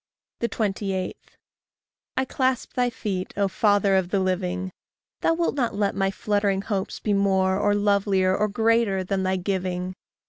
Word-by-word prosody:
28. 195 -5 -2 1.0
I 260 - +2
clasp 260 -1 -1
thy 245 -1 +1
feet, 195 -5 -4
O 200 -1 +3
father 205 0 +3
of 190 -2 +1
the 195 - +1
living! 185 0 -1 0.5
Thou 330 - +2
wilt 340 0 0
not 245 -7 -1
let 200 -1 +1
my 195 0 +1
fluttering 200 -1 0
hopes 195 -2 -3
be 210 - 0
more, 190 -1 +2
Or 205 0 +2
lovelier, 200 -2 +2
or 210 +2 +1
greater, 220 -2 +2
than 190 +1 -1
thy 190 0 +1
giving! 185 -1 -2
200 Hz, 150 wpm, -25 LUFS, 190-210 Hz, 1.0 s, O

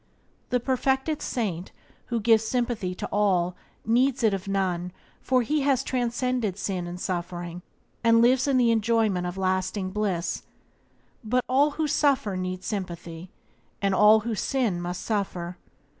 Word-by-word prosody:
The 250 - +2
perfected 265 +4 0
saint, 190 -7 -3 0.4
who 235 -2 -1
gives 225 0 +4
sympathy 225 -5 -1
to - - -5
all, 185 -4 +2 0.3
needs 245 +3 +2
it 220 -3 +4
of 195 0 -4
none, 180 -2 -1 0.3
for 255 -2 +2
he 300 +5 0
has 270 -2 +2
transcended 245 -5 -1
sin 185 -4 -3
and 175 +1 -6
suffering, 175 -1 -4 0.4
and 230 0 +5
lives 250 +3 +4
in 275 -2 +3
the 240 -2 +4
enjoyment 220 -5 +1
of 175 +2 -5
lasting 185 0 -1
bliss; 190 -4 -1 0.8
but 250 +3 0
all 280 +4 +3
who 315 - +1
suffer 275 -9 +2
need 185 0 -4
sympathy, 175 -3 -5 0.5
and 195 -1 +1
all 210 +2 +6
who 230 +1 -3
sin 215 -5 0
must 175 0 -4
suffer. 180 -5 -3
210 Hz, 145 wpm, -26 LUFS, 185-245 Hz, 0.8 s, all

